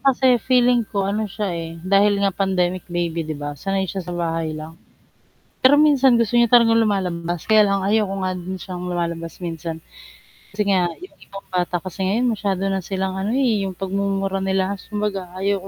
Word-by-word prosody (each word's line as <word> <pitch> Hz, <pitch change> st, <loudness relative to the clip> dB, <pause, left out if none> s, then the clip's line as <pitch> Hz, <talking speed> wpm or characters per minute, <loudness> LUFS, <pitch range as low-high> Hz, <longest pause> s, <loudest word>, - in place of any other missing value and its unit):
kasi 265 Hz, -1 st, +3 dB, 0.2 s
feeling 245 Hz, -2 st, +4 dB
ko 200 Hz, -1 st, -1 dB
ano 215 Hz, +2 st, -1 dB
siya, 210 Hz, 0 st, -3 dB
eh, 165 Hz, -1 st, -5 dB, 0.2 s
dahil 200 Hz, +1 st, +5 dB
nga 200 Hz, -, +3 dB
pandemic 185 Hz, -2 st, +1 dB
baby, 170 Hz, -1 st, -1 dB
'di 155 Hz, -1 st, -5 dB
ba, 145 Hz, 0 st, -4 dB
sanay 195 Hz, +6 st, -2 dB
siya 190 Hz, +1 st, -4 dB
sa 175 Hz, 0 st, -6 dB
bahay 165 Hz, -1 st, -1 dB
lang. 155 Hz, +1 st, -9 dB, 0.9 s
Pero 260 Hz, +2 st, +6 dB
minsan, 280 Hz, -4 st, +5 dB
gusto 230 Hz, 0 st, 0 dB
niya 235 Hz, 0 st, +4 dB
talagang 230 Hz, -1 st, +5 dB
lumalabas, 175 Hz, -5 st, -1 dB
kaya 215 Hz, -1 st, +5 dB
lang 200 Hz, -1 st, 0 dB
ayaw 210 Hz, +2 st, +2 dB
ko 195 Hz, -, -3 dB
nga 185 Hz, 0 st, 0 dB
din 185 Hz, +2 st, -5 dB
siyang 180 Hz, -1 st, -7 dB
lumalabas 170 Hz, -1 st, -3 dB
minsan. 165 Hz, -1 st, -4 dB, 0.7 s
Kasi 205 Hz, +1 st, -1 dB
nga 185 Hz, -3 st, +2 dB
'yung 370 Hz, -, -13 dB
ibang 195 Hz, 0 st, -11 dB
bata 180 Hz, -1 st, 0 dB
kasi 185 Hz, +2 st, -9 dB
ngayon 230 Hz, +6 st, +1 dB
masyado 195 Hz, -3 st, -2 dB
na 195 Hz, -1 st, -1 dB
silang, 190 Hz, +1 st, -3 dB
ano, 190 Hz, +2 st, -2 dB
eh, 235 Hz, -7 st, +2 dB
'yung 190 Hz, -1 st, -3 dB
pagmumura 195 Hz, 0 st, -1 dB
nila 190 Hz, +1 st, 0 dB
kumbaga 205 Hz, -3 st, -4 dB
ayaw 195 Hz, 0 st, 0 dB
195 Hz, 190 wpm, -21 LUFS, 175-210 Hz, 0.9 s, Pero